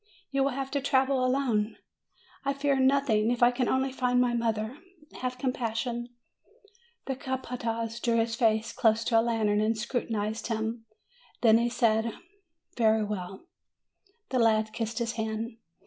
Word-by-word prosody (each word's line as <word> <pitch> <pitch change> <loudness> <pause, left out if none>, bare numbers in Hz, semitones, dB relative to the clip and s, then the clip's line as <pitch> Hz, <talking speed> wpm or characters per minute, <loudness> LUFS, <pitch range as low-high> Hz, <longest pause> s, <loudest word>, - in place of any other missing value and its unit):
"You 275 -1 +1
will 275 -1 0
have 270 0 -4
to 280 - 0
travel 265 -1 +2
alone." 250 -5 +1 0.7
"I 275 0 0
fear 280 -1 +1
nothing, 260 -5 +3
if 240 0 +1
I 240 - +7
can 250 -1 -1
only 265 0 +1
find 250 -1 +1
my 245 -1 +2
mother. 230 +2 -1 0.4
Have 255 0 -3
compassion!" 240 -1 -2 1.0
The 265 - -2
capataz 235 -3 -3
drew 235 -2 +1
his 225 0 +1
face 225 -1 +2
close 225 0 +2
to 225 0 +3
a - - +4
lantern, 220 -3 +1
and 220 +1 +1
scrutinized 220 -2 -2
him. 225 0 -3 0.6
Then 225 -1 +6
he 240 +1 +1
said, 230 -2 +1 0.6
'Very 220 -2 +3
well." 195 - -5 0.8
The 255 - 0
lad 220 -1 +3
kissed 225 -1 -3
his 235 -1 0
hand. 220 0 -4
235 Hz, 150 wpm, -28 LUFS, 220-255 Hz, 1.0 s, I